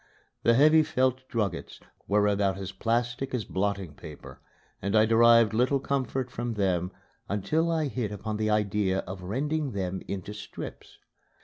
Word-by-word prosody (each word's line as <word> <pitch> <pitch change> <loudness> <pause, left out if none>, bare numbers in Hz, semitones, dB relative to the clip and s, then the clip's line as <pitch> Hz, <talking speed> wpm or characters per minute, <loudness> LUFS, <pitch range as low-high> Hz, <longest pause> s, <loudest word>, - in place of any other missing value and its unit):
The 115 0 +4
heavy 155 +4 +6
felt 130 -3 0
druggets 100 -7 -3 0.3
were 105 +1 +3
about 100 -2 +1
as 95 -1 -5
plastic 120 +6 -1
as 115 -5 -2
blotting 95 -4 -2
paper 75 -1 -11 0.4
and 100 +3 -1
I 110 0 +6
derived 115 0 +5
little 125 +5 +2
comfort 130 -2 -2
from 120 -1 -3
them 90 -3 0 0.4
until 155 - 0
I 160 -2 +1
hit 120 -6 -3
upon 105 +1 -4
the 110 0 0
idea 105 -2 +1
of 95 +1 -8
rending 140 +8 -2
them 95 -1 -3
into 100 +1 -5
strips. 105 0 -9
110 Hz, 150 wpm, -28 LUFS, 100-130 Hz, 0.4 s, heavy